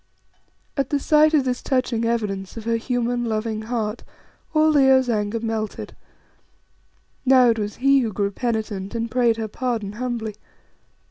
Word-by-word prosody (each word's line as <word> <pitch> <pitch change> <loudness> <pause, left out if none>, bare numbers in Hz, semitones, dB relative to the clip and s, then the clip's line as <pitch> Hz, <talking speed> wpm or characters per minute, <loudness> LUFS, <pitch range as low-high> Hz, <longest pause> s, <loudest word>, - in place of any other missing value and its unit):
At 275 -3 -1
the 290 - +1
sight 305 +2 +4
of 280 -3 +3
this 250 -1 -1
touching 250 -3 0
evidence 210 -4 -2
of 225 - -6
her 230 0 +1
human, 240 0 -1
loving 220 -1 -2
heart 220 -1 -3 0.5
all 310 0 +4
Leo's 265 -3 +4
anger 210 +1 -1
melted. 225 -1 -4 1.3
Now 255 -2 +6
it 225 - -2
was 205 0 -3
he 275 +1 +4
who 230 -4 -1
grew 200 0 -1
penitent 215 -3 -3
and 230 0 -2
prayed 240 -2 +2
her 220 -1 -3
pardon 225 -2 -3
humbly. 230 -1 -4
230 Hz, 150 wpm, -22 LUFS, 220-255 Hz, 1.3 s, Now